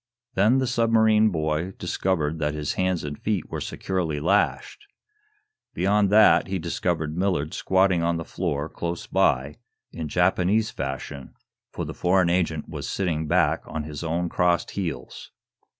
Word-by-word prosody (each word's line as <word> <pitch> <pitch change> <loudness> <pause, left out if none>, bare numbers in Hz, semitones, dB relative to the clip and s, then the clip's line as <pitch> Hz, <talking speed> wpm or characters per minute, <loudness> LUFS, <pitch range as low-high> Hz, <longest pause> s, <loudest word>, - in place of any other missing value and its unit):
Then 110 +7 +4
the 130 - +1
submarine 110 -2 +3
boy 80 +1 -2
discovered 85 -3 -1
that 75 0 -1
his 75 -1 -2
hands 95 -2 0
and 75 0 -6
feet 105 -6 -2
were - - -4
securely 85 -6 -2
lashed. 95 +7 0 0.9
Beyond 100 +2 +2
that, 105 +2 +5
he 95 0 -2
discovered 80 -2 -2
Millard 90 -5 -1
squatting 95 -2 +2
on 85 0 +1
the 80 - -5
floor, 75 +1 -2
close 85 +1 -5
by, 65 +3 +1 0.3
in 80 -2 -5
Japanese 95 +6 +2
fashion, 70 0 -6 0.4
for - - -4
the - - -6
foreign 90 -1 +2
agent 80 -4 0
was - - -6
sitting 80 -5 -1
back - - +2
on 80 - -4
his 75 +1 -7
own 85 +2 -1
crossed 90 0 +1
heels. 80 -10 -5
85 Hz, 150 wpm, -25 LUFS, 75-95 Hz, 0.9 s, that